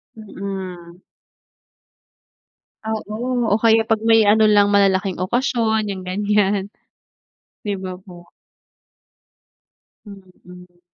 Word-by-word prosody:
Mm. 190 -5 -8 1.9
Oo, 225 +2 -3
o - - +3
kaya 225 0 +5
pag 220 -1 +1
may 225 -1 +5
ano 220 +1 +4
lang 205 -1 +4
malalaking 195 -2 +2
okasyon 220 +1 0
yung 190 -2 -5
ganyan. 200 +1 0 1.0
Di 205 - -1
ba 185 -1 -7
po? 175 -2 -15 1.8
Mm. 180 -3 -15
200 Hz, 90 wpm, -20 LUFS, 185-220 Hz, 1.9 s, kaya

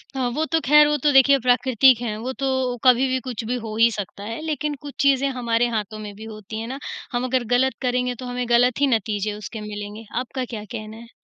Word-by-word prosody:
अ, - - -3 0.2
वो 315 - 0
तो 325 +1 +1
खैर 300 +3 +7
वो 295 0 +1
तो 295 - +4
देखिए 270 +1 +6
प्राकृतिक 250 0 +4
हैं, 225 -3 -3
वो 250 +4 -4
तो 260 -2 -1
कभी 255 0 +5
भी 260 0 0
कुछ 235 -2 -4
भी 240 +3 -2
हो 215 -1 -5
ही 230 +1 +6
सकता 200 -1 -6
है। 225 +6 -5
लेकिन 300 -1 -2
कुछ 285 -1 -8
चीज़ें 275 -1 +3
हमारे 240 -2 0
हाथों 215 0 -5
में 210 -1 -7
भी 215 - -11
होती 215 0 -8
हैं 225 - -5
ना, 265 +3 -6 0.3
हम 245 -1 -1
अगर 255 -1 0
गलत 265 +1 +2
करेंगे 250 -1 0
तो 255 - -9
हमें 245 0 -3
गलत 245 +2 +3
ही 285 - +5
नतीजे 215 -3 -1
उसके 210 +1 -7
मिलेंगे। 210 +1 -7
आपका 255 +1 -4
क्या 225 -3 -7
कहना 215 -2 -7
है? 230 0 -13
245 Hz, 235 wpm, -22 LUFS, 220-265 Hz, 0.3 s, खैर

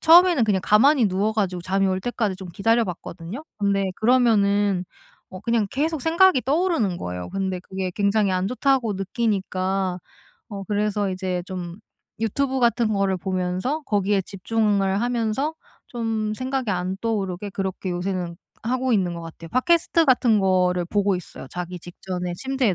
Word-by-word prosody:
처음에는 345 -5 +6
그냥 205 -3 +1
가만히 240 +3 +5
누워 195 +3 0
가지고 190 -5 -1
잠이 195 +2 +1
올 190 0 0
때까지 215 -3 -1
좀 185 -1 -9
기다려 225 +6 +2
봤거든요. 180 - -7
근데 200 -1 +1
그러면은 205 -5 +3 0.5
어 185 - -8
그냥 230 -1 +1
계속 310 +2 -1
생각이 335 -2 +5
떠오르는 285 - +1
거예요. 90 0 -5
근데 190 -2 -2
그게 190 0 -4
굉장히 200 -1 +2
안 185 0 0
좋다고 255 -3 +1
느끼니까. 190 -2 -1 0.5
어 200 -3 -6
그래서 205 0 0
이제 185 -1 -2
좀 180 -2 -6 0.4
유튜브 265 +4 0
같은 235 -2 +2
거를 195 -2 +1
보면서 185 - -2
거기에 200 -1 +1
집중을 200 0 0
하면서 245 +5 0 0.3
좀 225 -3 -2
생각이 255 -1 -2
안 185 0 -1
떠오르게 205 -3 -2
그렇게 190 -1 -3
요새는 175 -1 -3 0.3
하고 255 +2 0
있는 185 -4 +1
것 170 - -6
같아요. 165 0 -10
팟캐스트 330 +5 +3
같은 245 -4 +4
거를 180 -2 +2
보고 200 +1 +1
있어요 180 -6 -9
자기 180 +2 -5
직전에 180 +1 -5
침대에 260 -4 0
200 Hz, 355 characters per minute, -23 LUFS, 185-235 Hz, 0.5 s, 처음에는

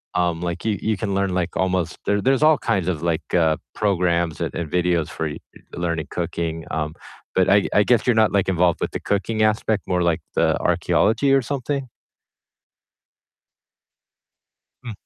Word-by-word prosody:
um, 85 -1 0
like, 85 0 -4
you 105 -2 +1
you 110 -1 0
can 100 -1 -2
learn, 95 -1 0
like, 90 -1 -2
almost 90 -2 0
there 100 0 +1
there's 135 +4 +2
all 155 -1 +6
kinds 95 -4 -1
of, 85 -5 -1
like, 85 -1 -2
uh, 80 -3 +3 0.2
programs 85 -5 0
and - - -2
and 85 -3 -3
videos 90 -3 +1
for 80 - -3
y 75 - -6 0.4
learning 85 -2 -2
cooking, 85 -1 -3
um, 75 -1 -2 0.4
but 95 -1 +3
I 100 0 +4
I 105 - +5
guess 115 0 +2
you're 125 - +4
not, 110 -4 +3
like, 100 -2 +1
involved 90 -1 +2
with - - -1
the - - -4
cooking 105 +2 -1
aspect, 110 -1 +1
more 90 -1 +1
like 85 -1 +1
the - - +2
archeology 115 +6 +2
or 135 - +4
something? 135 +1 -3 3.0
Hmm. 120 - -6
90 Hz, 170 wpm, -22 LUFS, 85-105 Hz, 3.0 s, all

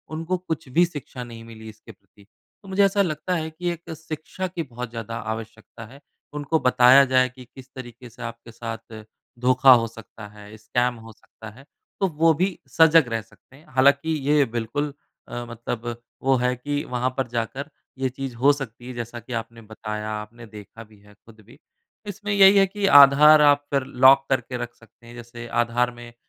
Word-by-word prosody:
उनको 165 +3 -2
कुछ 160 -6 -5
भी 170 +7 +3
शिक्षा 145 -6 -8
नहीं 115 -1 -11
मिली 110 -1 -11
इसके 110 +1 -14
प्रति। 100 0 -24 0.4
तो 195 - -15
मुझे 195 +1 +2
ऐसा 200 +1 +2
लगता 175 0 -2
है 160 -1 -3
कि 175 +2 -4
एक 170 0 -10
शिक्षा 160 +4 -6
की 175 -2 -5
बहुत 125 -3 -8
ज़्यादा 115 -1 -7 0.2
आवश्यकता 110 0 -10
है। 135 +5 -15 0.3
उनको 150 +2 -1
बताया 125 +2 +6
जाए 130 -1 +2
कि 125 0 -14
किस 130 -1 -13
तरीके 120 -1 -10
से 115 - -16
आपके 115 0 -8
साथ 115 -1 -8 0.4
धोखा 130 +1 +6
हो 115 -1 +2
सकता 115 -1 -12
है, 105 +1 -14
स्कैम 120 +3 -1
हो 115 0 -13
सकता 110 +1 -14
है। 130 +6 -17 0.3
तो 195 - +2
वो 160 0 +2
भी 185 +4 -1
सजग 160 -2 +5
रह 115 - -1
सकते 115 +4 -23
हैं। 150 - -19
हालाँकि 140 +4 +3 0.2
ये 150 -2 +4
बिल्कुल 120 +5 -3 0.3
अ, 120 - -6
मतलब 120 0 -6 0.3
वो 135 0 +3
है 125 +1 0
कि 145 +3 -3
वहाँ 125 +1 -1
पर 135 - -1
जाकर 120 +5 -4 0.3
ये 130 -1 0
चीज़ 130 -1 -7
हो 135 +5 +4
सकती 125 -3 -8
है 130 - -7
जैसा 120 0 -6
कि 120 +2 -10
आपने 115 0 -12
बताया, 105 0 -6
आपने 110 +2 -8
देखा 110 +1 -12
भी 105 -1 -21
है 105 0 -20
खुद 110 +2 -20
भी। 125 +6 -18 0.5
इसमें 205 +1 -5
यही 200 0 +7
है 195 - +6
कि 200 +1 -3
आधार 150 +2 +7
आप 145 -1 +4
कर 135 -2 +1 0.2
लॉक 135 +1 +7
करके 130 -1 -1
रख 120 0 -6
सकते 115 +1 -23
हैं। 120 - -12
जैसे 120 0 -10
आधार 120 +1 0
में 120 -1 -12
125 Hz, 195 wpm, -23 LUFS, 115-145 Hz, 0.5 s, यही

